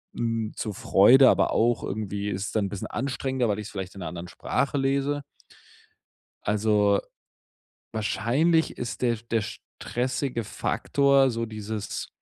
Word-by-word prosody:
n 115 -2 -2
zur 105 - -3
Freude." 125 +8 +6
Aber - - +3
auch 120 +1 +2
irgendwie 100 0 -3
ist 95 0 -3
es - - -5
dann 110 -2 0
'n - - -3
bisschen 100 -1 -5
anstrengender, 130 -1 -1
weil 105 0 0
ich's 105 0 -6
vielleicht 95 -1 -6
in - - -9
'ner 85 - -4
anderen 85 +2 -6
Sprache 140 +9 -1
lese. 140 +1 0 1.2
Also, 105 -1 +3 0.9
wahrscheinlich 135 +10 +1
ist 120 - -5
der 120 -2 +2
sch 115 +2 -17
der 115 - +2 0.4
stressige 125 -1 -2
Faktor, 140 +5 +2
so 115 -1 -2
dieses 110 -1 -5
115 Hz, 145 wpm, -26 LUFS, 105-130 Hz, 1.2 s, Freude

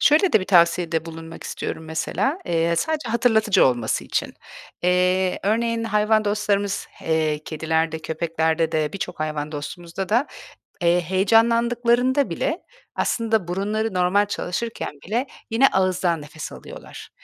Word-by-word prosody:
Şöyle 315 +6 +4
de 220 - +5
bir - - -3
tavsiyede 170 -2 +3
bulunmak 165 0 -9
istiyorum 160 - -5
mesela, 160 - -1
eee, 170 -1 +1
sadece 310 - -1
hatırlatıcı 225 -3 +3
olması 120 -4 0
için. - - -2 0.5
Eee, 180 +1 +2
örneğin, 230 +2 0
hayvan 215 0 +2
dostlarımız, 205 -1 0 0.2
eee, 155 -2 +1
kedilerde, 160 0 -1
köpeklerde 160 0 -1
de, 155 -2 0
birçok 195 -5 -5
hayvan 155 -1 -3
dostumuzda 170 +5 -6
da, 240 +7 +2 0.6
eee, 175 +1 +3
heyecanlandıklarında 235 - +2
bile 295 - -2 0.4
aslında 220 -5 0
burunları 210 +4 -1
normal 185 +3 +3
çalışırken 205 +3 -4 0.2
bile 240 +7 -1 0.2
yine 235 +5 +5
ağızdan 185 - +1
nefes 150 +1 -8
alıyorlar. - - -11
185 Hz, 125 wpm, -23 LUFS, 165-225 Hz, 0.6 s, de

